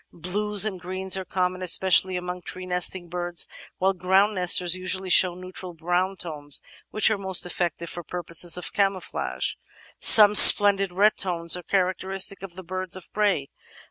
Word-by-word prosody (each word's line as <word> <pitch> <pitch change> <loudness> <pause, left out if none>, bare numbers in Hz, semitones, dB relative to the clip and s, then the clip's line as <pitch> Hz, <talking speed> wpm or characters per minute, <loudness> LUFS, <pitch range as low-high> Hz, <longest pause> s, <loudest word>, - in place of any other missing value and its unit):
Blues 205 +4 0
and 195 -4 -5
greens 185 +1 -2
are 190 - -4
com 180 0 -2
mon 185 - -12
especially 185 +1 +1
among 180 0 -7
tree 185 +1 -8
nesting 180 0 -2
birds, 175 0 -4 0.3
while 190 +1 0
ground 190 +3 0
nesters 180 -1 +2
usually 185 0 -3
show 180 -1 +3
neutral 185 -1 -9
brown 180 +4 -3
tones 150 -5 -5 0.3
which 215 +1 +1
are 210 - -3
most 190 -2 -1
eflFective 170 -1 -5
for 175 - -8
purposes 175 0 0
of 180 - -7
"camouflage"; 185 - -3 0.5
some 210 -1 +8
splendid 200 -2 +7
red 205 +4 +1
tones 170 -3 0
are 180 - -8
char 185 0 -1
acteristic 195 +1 -2
of 190 -3 -11
the 185 - -11
birds 185 +1 -5
of 185 - -12
prey. 200 -10 -2
185 Hz, 170 wpm, -23 LUFS, 175-190 Hz, 0.5 s, some